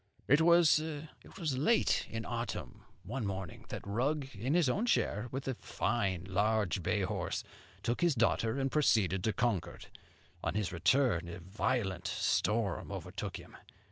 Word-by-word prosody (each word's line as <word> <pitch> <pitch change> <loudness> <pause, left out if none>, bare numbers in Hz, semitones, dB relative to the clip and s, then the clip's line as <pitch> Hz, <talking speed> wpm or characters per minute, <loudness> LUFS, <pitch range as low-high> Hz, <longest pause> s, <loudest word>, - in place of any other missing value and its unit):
"It 140 +4 +5
was 170 -2 +6 0.7
late 150 - +2
in 115 0 -4
autumn, 120 -1 -5 0.2
one 120 +7 -4
morning, 95 -4 -5
that - - -6
Rugg, 135 +7 -1
in 120 +9 -1
his 175 -5 +4
own 205 - +1
chair, 110 - +1
with 135 +1 -4
a 130 - 0
fine 100 -7 -1
large 100 0 +1
bay 100 +4 0
horse, 95 -2 -2 0.4
took 120 +6 -1
his 170 -4 +3
daughter 115 +1 +2
and 135 0 0
proceeded 95 - +3
to 110 - +2
Concord. 110 -7 -2 0.5
On - - -1
his 105 -3 0
return 90 -1 +2
a 85 - -6
violent 95 0 -1
storm 105 -3 0
overtook - - -5
him. - - -13
115 Hz, 145 wpm, -33 LUFS, 95-135 Hz, 0.7 s, was